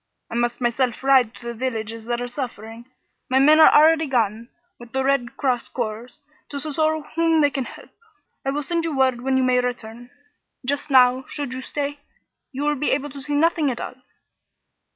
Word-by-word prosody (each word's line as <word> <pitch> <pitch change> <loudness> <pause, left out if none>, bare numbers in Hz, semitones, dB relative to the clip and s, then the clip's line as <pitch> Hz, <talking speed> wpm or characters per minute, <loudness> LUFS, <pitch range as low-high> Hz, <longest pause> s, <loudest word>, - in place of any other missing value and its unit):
I - - -6
must 240 0 -1
myself 245 0 -1
ride 260 -4 +4
to 235 - -14
the 235 - -4
villages 225 -2 -4
that 240 0 -2
are 245 - -3
suffering. 235 -2 -7 0.4
My 260 - +2
men 300 +4 +6
are 315 - +8
already 315 +1 +5
gone, 230 -2 -1 0.3
with 240 -1 -13
the 265 0 0
Red 270 -3 0
Cross 255 -4 0
corps, 230 0 -4 0.4
to 285 - -5
succor 310 +2 0
whom 330 -1 +3
they 290 -1 +3
can. 265 -3 -3 0.8
I 270 - -1
will 290 +2 -2
send 335 +4 -1
to 330 - -2
you 295 - -4
word 260 -2 +2
when 265 +1 +1
you 260 - +2
may 255 0 +3
return. 245 -1 -5 0.6
Just 285 +3 -2
now, 255 -1 +5
should 285 -4 -5
you 260 - -5
stay, 285 +1 -4 0.5
you 275 +2 -4
will 295 0 +2
be 295 +1 -1
able 290 +1 -1
to 280 +1 -9
see 290 +2 -3
nothing 320 -1 +2
at 245 - -4
all." - - -5
260 Hz, 195 wpm, -22 LUFS, 240-290 Hz, 0.8 s, are